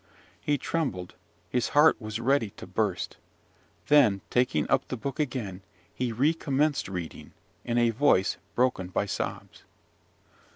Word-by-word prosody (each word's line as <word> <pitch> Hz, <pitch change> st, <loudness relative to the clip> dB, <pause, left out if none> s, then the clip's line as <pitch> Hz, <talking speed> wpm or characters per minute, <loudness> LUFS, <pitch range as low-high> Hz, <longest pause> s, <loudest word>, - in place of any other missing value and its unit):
He 145 Hz, -1 st, +1 dB
trembled; 130 Hz, -, -2 dB, 0.3 s
his 125 Hz, -1 st, 0 dB
heart 150 Hz, -3 st, +6 dB
was 110 Hz, +1 st, -4 dB
ready 125 Hz, -2 st, +2 dB
to -, -, -8 dB
burst: -, -, -2 dB, 0.7 s
then, 125 Hz, -10 st, +5 dB
taking 125 Hz, +1 st, +2 dB
up 135 Hz, -, +1 dB
the 130 Hz, -, -4 dB
book 130 Hz, +5 st, -5 dB
again, 115 Hz, -10 st, -3 dB, 0.3 s
he 125 Hz, -2 st, -2 dB
recommenced 145 Hz, +3 st, +1 dB
reading, 90 Hz, -4 st, -6 dB, 0.3 s
in 120 Hz, 0 st, -1 dB
a 120 Hz, -1 st, +4 dB
voice 110 Hz, -6 st, +3 dB, 0.2 s
broken 125 Hz, -7 st, +1 dB
by 95 Hz, +2 st, -1 dB
sobs. 100 Hz, -, -5 dB
125 Hz, 130 wpm, -28 LUFS, 105-140 Hz, 0.7 s, heart